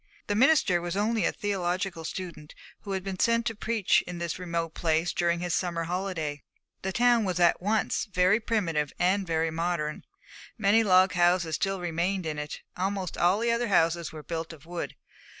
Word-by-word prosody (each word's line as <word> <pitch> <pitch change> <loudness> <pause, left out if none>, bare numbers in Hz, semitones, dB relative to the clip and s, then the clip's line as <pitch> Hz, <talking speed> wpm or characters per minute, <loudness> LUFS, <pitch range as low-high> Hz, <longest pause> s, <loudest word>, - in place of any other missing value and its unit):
The 205 - -1
minister 220 - +4
was 175 +2 -3
only 220 +2 +1
a - - +2
theological 185 -3 -2
student 170 -4 -7 0.2
who 200 - -6
had 190 -1 -2
been 190 -1 -5
sent 230 0 +2
to 225 - -1
preach 220 -2 +2
in 180 0 -5
this 170 +1 -3
remote 170 -2 -3
place 165 +1 0
during 170 0 +1
his 175 -1 -2
summer 170 -3 -1
holiday. 165 -4 -3 0.4
The 190 - -2
town 240 +2 +3
was 180 -3 -1
at 175 0 +4
once 215 +4 0
very 195 +1 +3
primitive 170 - -1
and 190 +2 +1
very 165 0 0
modern. 165 -2 -2 0.5
Many 215 +1 +4
log 185 -2 +5
houses 175 -2 +2
still 195 +2 -1
remained 175 +2 -1
in 155 -2 -3
it; 150 0 -6
almost 190 0 -2
all 180 +3 +3
the 235 +2 +1
other 235 +1 0
houses 170 -3 +2
were 155 -1 -9
built 165 0 -4
of 155 -1 -15
wood. 175 +1 -5
180 Hz, 185 wpm, -28 LUFS, 165-200 Hz, 0.5 s, log